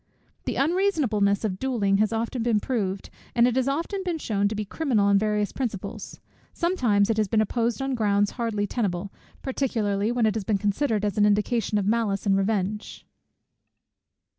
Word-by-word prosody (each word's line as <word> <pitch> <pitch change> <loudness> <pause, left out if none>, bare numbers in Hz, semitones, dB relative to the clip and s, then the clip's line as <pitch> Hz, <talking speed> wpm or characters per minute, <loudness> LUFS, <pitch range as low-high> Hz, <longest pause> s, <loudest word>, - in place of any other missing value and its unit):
The - - -2
unreasonableness 275 - +1
of 190 -3 -2
duelling 220 -7 +1
has 215 +1 +2
been 225 - -2
often 230 -1 0
proved, 200 -5 -3 0.2
and 240 0 +5
it 250 - 0
has 260 0 +1
often 335 +8 -2
been 350 -3 -2
shewn 205 -8 0
to 215 - -3
be 210 0 -3
criminal 235 -3 0
on 200 0 +4
various 210 -1 0
principles: 225 -8 -5 0.3
sometimes 235 - +2
it 220 - -1
has 215 -1 +2
been 215 +3 +1
opposed 235 +4 0
on 270 0 -1
grounds 205 -3 +1
hardly 225 -4 -2
tenable; 200 -3 -2 0.3
particularly 225 -6 -1
when 240 -2 +1
it 215 - +2
has 220 - -3
been 205 +1 +1
considered 210 +2 0
as 205 0 -1
an 205 - +5
indication 210 +1 +1
of 200 - 0
malice 210 -2 0
and 195 -1 +3
revenge. 200 +1 -2
215 Hz, 175 wpm, -25 LUFS, 200-245 Hz, 0.3 s, and